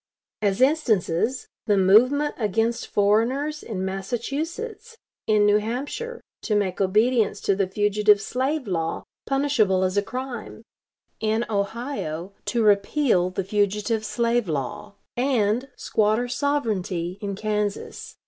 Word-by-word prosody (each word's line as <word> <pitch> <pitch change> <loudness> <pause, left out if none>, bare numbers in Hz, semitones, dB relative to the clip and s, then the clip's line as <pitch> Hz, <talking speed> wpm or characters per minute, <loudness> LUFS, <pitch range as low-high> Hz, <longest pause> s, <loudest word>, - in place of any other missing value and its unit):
As 200 +1 +1
instances, 255 - +1 0.2
the 205 -2 +3
movement 250 +10 +4
against 225 +2 0
foreigners 245 +9 +1
in 190 -4 -4
Massachusetts; 315 - -4 0.3
in 210 -1 +4
New 205 0 +5
Hampshire, 290 - -4 0.2
to 215 - -1
make 200 -2 0
obedience 215 +4 +2
to 200 - +1
the 195 -1 0
fugitive 210 +1 +3
slave 265 +6 -2
law 165 -3 -2 0.2
punishable 265 -9 +2
as 185 +1 0
a - - +5
crime; 245 -1 -6 0.6
in 220 +2 0
Ohio, 200 - -3
to 235 -2 0
repeal 205 -1 +3
the 185 +1 -3
fugitive 210 +3 0
slave 235 -2 0
law; 150 +6 -4 0.2
and, 245 -1 +1
squatter 215 +3 +1
sovereignty, 215 - -1
in 200 -1 -3
Kansas. 210 0 -3
215 Hz, 120 wpm, -24 LUFS, 200-255 Hz, 0.6 s, New